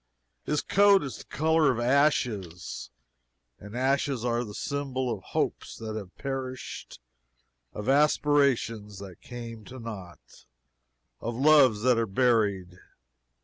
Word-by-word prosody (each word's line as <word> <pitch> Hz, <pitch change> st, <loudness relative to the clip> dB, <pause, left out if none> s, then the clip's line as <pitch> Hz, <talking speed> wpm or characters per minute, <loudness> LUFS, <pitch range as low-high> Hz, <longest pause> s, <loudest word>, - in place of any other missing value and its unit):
His 150 Hz, -, 0 dB
coat 200 Hz, -1 st, +5 dB
is 135 Hz, -, -6 dB
the -, -, -11 dB
color 160 Hz, -1 st, +2 dB
of 120 Hz, -, -3 dB
ashes: 120 Hz, -, 0 dB, 0.7 s
and 105 Hz, +4 st, -9 dB
ashes 135 Hz, -1 st, 0 dB
are 120 Hz, 0 st, 0 dB
the 105 Hz, -3 st, -9 dB
symbol 130 Hz, -3 st, -2 dB
of 100 Hz, -, -7 dB
hopes -, -, -3 dB
that 110 Hz, -1 st, -6 dB
have 100 Hz, -4 st, -8 dB
perished, 130 Hz, -, -6 dB, 0.7 s
of 105 Hz, +2 st, -7 dB
aspirations 135 Hz, -7 st, +2 dB
that 95 Hz, -3 st, -10 dB
came 115 Hz, -2 st, -8 dB
to 130 Hz, -, -10 dB
nought, 105 Hz, -7 st, -10 dB, 0.7 s
of 115 Hz, 0 st, -4 dB
loves 135 Hz, -5 st, +5 dB
that 125 Hz, -2 st, +4 dB
are 115 Hz, -, 0 dB
buried. 100 Hz, -5 st, +1 dB
120 Hz, 125 wpm, -27 LUFS, 105-140 Hz, 0.7 s, coat